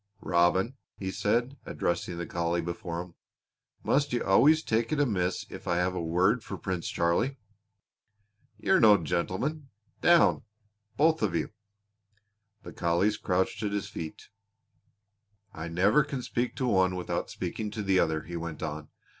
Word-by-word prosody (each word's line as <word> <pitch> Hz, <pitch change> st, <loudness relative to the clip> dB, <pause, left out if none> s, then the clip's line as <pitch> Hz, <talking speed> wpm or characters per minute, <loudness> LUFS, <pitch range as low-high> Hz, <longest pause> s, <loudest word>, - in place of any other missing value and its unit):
"Robin," 95 Hz, +8 st, +2 dB, 0.2 s
he 95 Hz, -1 st, -4 dB
said, 120 Hz, +8 st, 0 dB
addressing 85 Hz, 0 st, -2 dB
the 85 Hz, -, -3 dB
collie 85 Hz, -3 st, -1 dB
before 85 Hz, 0 st, -4 dB
him, 90 Hz, -1 st, -16 dB, 0.7 s
"must 145 Hz, +1 st, +1 dB
you 120 Hz, -, 0 dB
always 150 Hz, +11 st, +5 dB
take 115 Hz, +1 st, 0 dB
it 155 Hz, -, 0 dB
amiss 95 Hz, -10 st, 0 dB
if -, -, -9 dB
I 85 Hz, -, +1 dB
have 90 Hz, +1 st, +1 dB
a 90 Hz, -, -3 dB
word 90 Hz, +8 st, +2 dB
for 95 Hz, -, -6 dB
Prince 90 Hz, -2 st, -3 dB
Charlie? 85 Hz, +11 st, 0 dB, 1.2 s
You're 190 Hz, -, +3 dB
no 105 Hz, -3 st, +7 dB
gentleman! 95 Hz, -, -2 dB, 0.3 s
Down, 175 Hz, -1 st, +5 dB, 0.6 s
both 160 Hz, +2 st, +3 dB
of 100 Hz, -6 st, 0 dB
you!" -, -, -1 dB, 1.1 s
The -, -, -9 dB
collies 85 Hz, +5 st, +1 dB
crouched 95 Hz, +3 st, -1 dB
at 105 Hz, -2 st, -2 dB
his 100 Hz, 0 st, -2 dB
feet. 80 Hz, -5 st, -8 dB, 1.2 s
"I 80 Hz, +1 st, -6 dB
never 95 Hz, -, +3 dB
can 140 Hz, -3 st, -5 dB
speak 120 Hz, +1 st, -2 dB
to 130 Hz, -, -2 dB
one 95 Hz, -4 st, +3 dB
without 90 Hz, -, -3 dB
speaking 105 Hz, +4 st, -4 dB
to 105 Hz, 0 st, -5 dB
the 95 Hz, -1 st, +3 dB
other," 80 Hz, -2 st, +1 dB
he 85 Hz, +2 st, -8 dB
went 85 Hz, -2 st, -5 dB
on. 75 Hz, -1 st, -5 dB
95 Hz, 155 wpm, -28 LUFS, 85-115 Hz, 1.2 s, no